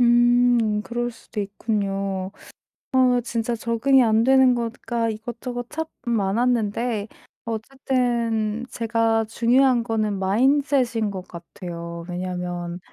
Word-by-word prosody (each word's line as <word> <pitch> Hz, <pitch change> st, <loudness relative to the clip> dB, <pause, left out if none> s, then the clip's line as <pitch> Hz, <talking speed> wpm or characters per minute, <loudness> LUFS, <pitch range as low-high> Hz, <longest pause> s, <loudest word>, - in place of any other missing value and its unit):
음 240 Hz, -2 st, +4 dB
그럴 240 Hz, +2 st, -3 dB
수도 225 Hz, -1 st, -7 dB
있군요. 195 Hz, -2 st, -2 dB, 0.6 s
어 255 Hz, -2 st, +4 dB
진짜 235 Hz, -1 st, -2 dB
적응이 235 Hz, +4 st, +3 dB
안 220 Hz, -1 st, +3 dB
되는 265 Hz, 0 st, +5 dB
거가 235 Hz, 0 st, -2 dB
이것저것 240 Hz, +2 st, -5 dB
참 320 Hz, +1 st, -3 dB, 0.2 s
많았는데 225 Hz, 0 st, 0 dB, 0.4 s
어쨌든 235 Hz, -2 st, -1 dB
제가 225 Hz, -1 st, +1 dB
중요한 240 Hz, +2 st, +3 dB
거는 220 Hz, -2 st, -1 dB
mindset 250 Hz, +5 st, +2 dB
인 215 Hz, -2 st, 0 dB
것 185 Hz, -2 st, -7 dB
같아요. 170 Hz, -1 st, -8 dB
왜냐하면 180 Hz, -1 st, -4 dB
230 Hz, 250 characters per minute, -23 LUFS, 205-245 Hz, 0.6 s, 되는